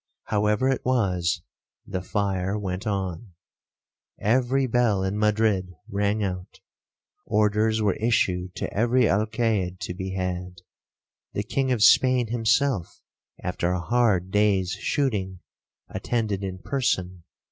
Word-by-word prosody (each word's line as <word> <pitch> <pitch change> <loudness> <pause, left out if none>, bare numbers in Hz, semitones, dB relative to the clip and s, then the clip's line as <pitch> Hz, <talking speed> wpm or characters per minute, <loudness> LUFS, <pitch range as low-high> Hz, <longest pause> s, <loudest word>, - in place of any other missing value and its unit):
However 105 +3 +1
it 135 - 0
was, 95 -9 0 0.4
the 95 - -4
fire 95 0 -1
went 95 +1 -4
on. 95 0 -3 0.9
Every 130 +4 +2
bell 115 -5 +2
in 95 +1 -1
Madrid 105 -4 +1
rang 100 +2 0
out.—Orders 105 +3 -2
were 100 -3 +3
issued 95 -5 0
to - - -4
every 120 +4 +3
Alcaide 105 -3 0
to 90 - -4
be 95 0 -5
had.—The 90 +2 -7
king 130 +5 -1
of 115 -4 +2
Spain 125 0 +5
himself, 120 -2 0 0.4
(after 90 -1 -1
a 90 - -1
hard 100 -3 +1
day's 100 -3 +2
shooting1), 105 -10 -1 0.5
attended 110 -5 -2
in 95 -1 -4
person. 95 -10 -1
105 Hz, 115 wpm, -25 LUFS, 95-115 Hz, 0.9 s, Spain